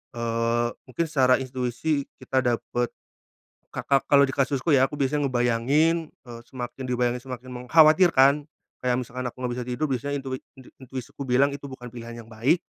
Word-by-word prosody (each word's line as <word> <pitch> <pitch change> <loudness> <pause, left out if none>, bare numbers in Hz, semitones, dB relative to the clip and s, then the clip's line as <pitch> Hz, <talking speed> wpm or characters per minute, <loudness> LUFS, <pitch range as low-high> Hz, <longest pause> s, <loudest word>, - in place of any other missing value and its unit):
Eee, 115 0 0 0.2
mungkin 165 +6 -1
secara 130 -4 +4
intuisi 130 +3 -2 0.2
kita 130 - +1
dapat 120 -1 0 0.9
ka - - -3
ka 140 -1 +3
kalau 140 -1 +6
di 135 - -4
kasusku 140 +3 0
ya 135 -2 +5
aku 145 - -9
biasanya 145 +1 0
ngebayangin, 135 +7 +1
eee, 120 -2 -11
semakin 130 +1 -6
dibayangin 125 0 0
semakin 125 0 -7 0.2
mengkhawatirkan. 155 -2 +5 0.3
Kayak 125 -1 0
misalkan 125 +1 -5
aku 125 - -5
enggak 125 - -1
bisa 125 - -3
tidur, 125 +5 -1
biasanya 135 +2 -2
intui 130 -1 -4 0.2
inti 130 -2 -15
intuisiku 130 +1 -7
bilang 130 +3 +3
itu 140 0 -7
bukan 125 -3 -9
pilihan 115 -1 -8
yang 115 - -18
baik. 120 +10 +1
130 Hz, 170 wpm, -25 LUFS, 120-140 Hz, 0.9 s, kalau